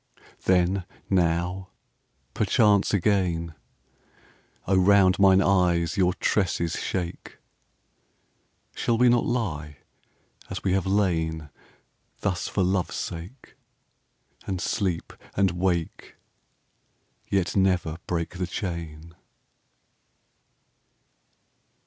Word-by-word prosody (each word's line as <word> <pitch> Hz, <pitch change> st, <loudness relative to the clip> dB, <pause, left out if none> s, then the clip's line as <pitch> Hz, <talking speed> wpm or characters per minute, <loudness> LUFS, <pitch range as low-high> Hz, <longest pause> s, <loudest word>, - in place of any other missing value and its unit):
Then, 90 Hz, 0 st, +2 dB, 0.3 s
now, 90 Hz, +1 st, 0 dB, 0.6 s
perchance 105 Hz, -2 st, +3 dB
again!... 90 Hz, -4 st, 0 dB, 1.1 s
O 95 Hz, -, +2 dB
round 95 Hz, 0 st, +4 dB
mine 95 Hz, -1 st, +6 dB
eyes 90 Hz, -3 st, +2 dB
your 90 Hz, -2 st, +2 dB
tresses 85 Hz, -5 st, 0 dB
shake! 90 Hz, -2 st, -4 dB, 1.4 s
Shall 115 Hz, -, 0 dB
we 125 Hz, +1 st, +5 dB
not 120 Hz, 0 st, +2 dB
lie 80 Hz, -, -3 dB, 0.7 s
as -, -, -6 dB
we 95 Hz, -, +1 dB
have 95 Hz, 0 st, 0 dB
lain 80 Hz, -6 st, 0 dB, 0.7 s
Thus 90 Hz, -3 st, -1 dB
for 95 Hz, -, 0 dB
Love's 95 Hz, 0 st, 0 dB
sake, 90 Hz, +10 st, -7 dB, 0.9 s
And 95 Hz, -2 st, -2 dB
sleep, 90 Hz, -2 st, -2 dB, 0.2 s
and 95 Hz, -2 st, +3 dB
wake, 85 Hz, -2 st, -2 dB, 1.1 s
yet 95 Hz, -3 st, 0 dB
never 90 Hz, -4 st, +1 dB
break 85 Hz, +1 st, -3 dB
the 90 Hz, -, -1 dB
chain? 85 Hz, -4 st, -6 dB
90 Hz, 90 wpm, -25 LUFS, 85-100 Hz, 1.4 s, mine